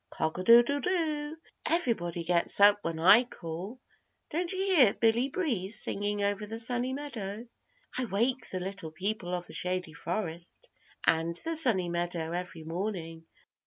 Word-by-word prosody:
Cock 160 +2 -3
a - - -3
doodle 240 +6 +6
do. 310 -3 -1 0.3
Everybody 185 - 0
gets 170 +2 +1
up 205 0 +7
when 165 -3 -3
I 200 +8 +7
call. 185 +1 -7 0.5
Don't 340 +2 -1
you 380 - -2
hear 360 - +4
Billy 235 +3 +2
Breeze 225 - -1
singing 205 0 -1
over 205 +1 -1
the 225 +2 -5
Sunny 245 +2 +1
Meadow? 235 -6 -6 0.5
I 255 - 0
wake 235 +5 -1
the 185 - -3
Little 190 -2 -5
People 180 +2 -3
of 175 0 -5
the - - -10
Shady 180 0 -1
Forest 170 - -5 0.3
and 165 +1 +1
the 330 0 -1
Sunny 230 - +4
Meadow 170 -1 -3
every 175 -2 -5
morning. 165 -1 -5
205 Hz, 155 wpm, -29 LUFS, 175-250 Hz, 0.5 s, up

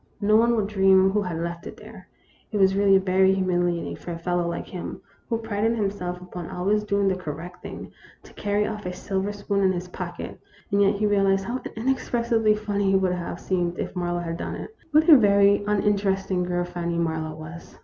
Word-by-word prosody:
No 210 +1 +3
one 235 +2 +4
would 215 -3 +1
dream 190 -2 +4
who 210 +1 +1
had 180 -4 -3
left 170 0 -5
it - - -9
there. - - -13 0.4
It 215 - -1
was 190 -1 +4
really 195 0 +5
very 190 0 +3
humiliating 175 -2 0
for 175 - -8
a 165 - -4
fellow 175 0 -1
like 170 - -4
him, 180 -2 -7 0.3
who 230 - +1
prided 225 0 -1
himself 195 -4 -2
upon 180 -1 -8
always 205 +4 0
doing 200 -1 +1
the 190 - +2
correct 180 +1 -7
thing, - - -8 0.3
to - - -16
carry 205 0 0
off 210 -3 -5
a 180 - -3
silver 195 +2 -2
spoon 200 -1 -2
in 190 - +4
his 180 0 -4
pocket, - - -7 0.3
and 200 0 +3
yet 200 +1 +4
he 210 +1 0
realized 195 -1 +2
how 245 +5 -3
inexpressibly 235 -2 +1
funny 205 -2 0
it - - +6
would 190 -1 +1
have 175 -1 -5
seemed 175 -2 -1
if - - -4
Marlowe 175 -1 -1
had 165 -1 -4
done - - -4
it. 440 - -8
What 310 +1 +4
a 320 - +10
very 200 -3 +5
un 210 -1 +1
interesting 195 -2 +1
girl 175 0 -1
Fanny 170 -1 -3
Marlowe 160 -2 -2
was 165 +2 -10
195 Hz, 210 wpm, -25 LUFS, 175-205 Hz, 0.4 s, a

